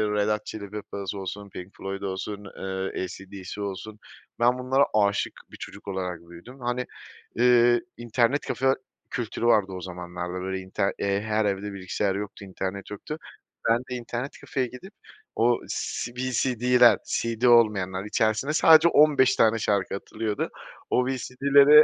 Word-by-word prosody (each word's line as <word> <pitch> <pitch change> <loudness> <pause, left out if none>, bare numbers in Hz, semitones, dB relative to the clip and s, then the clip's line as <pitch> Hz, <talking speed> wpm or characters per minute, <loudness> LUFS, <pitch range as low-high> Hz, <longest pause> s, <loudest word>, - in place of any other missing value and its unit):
Red 105 0 +2
Hot 105 0 -1
Chili 100 -2 -7
Peppers 100 -2 -5
olsun, 100 +1 -6
Pink 90 0 -10
Floyd 95 0 -5
olsun, 100 +1 -4
eee, 95 0 -3
AC/DC 95 +2 -7
olsun, 100 +2 -6 0.4
ben 125 +2 +3
bunlara 130 +2 +3
aşık 100 -1 +2 0.2
bir - - -11
çocuk - - -10
olarak 90 -3 -3
büyüdüm. 85 +10 -13
Hani, 125 +1 -2 0.5
eee, 120 0 +5 0.2
internet 120 +3 +1
kafe 130 0 +2 0.4
kültürü 120 -1 -3
vardı 105 -5 +4
o 90 -1 -6
zamanlarda 90 0 -5
böyle 95 +1 -3
inter 95 +1 -1
her 105 +2 0
evde 100 0 -2
bilgisayar 95 +1 -1
yoktu, 100 0 -6
internet 95 +1 -5
yoktu. 125 +9 -6 0.5
Ben 115 - +5
de - - -1
internet 120 +2 -4
kafeye 130 -2 -1
gidip 155 - -11 0.4
o 120 +1 +3
C 120 - -3
VCD'ler 125 -1 +4
CD 115 +1 -1
olmayanlar 100 -5 +4
içerisine 110 +6 +1
sadece 160 +1 +7
15 145 -5 +5
tane 115 0 +4
şarkı 100 -3 0
atılıyordu. 105 +1 -3 0.4
O 125 - +2
VCD'lere 140 +3 +6
105 Hz, 145 wpm, -26 LUFS, 95-125 Hz, 0.5 s, sadece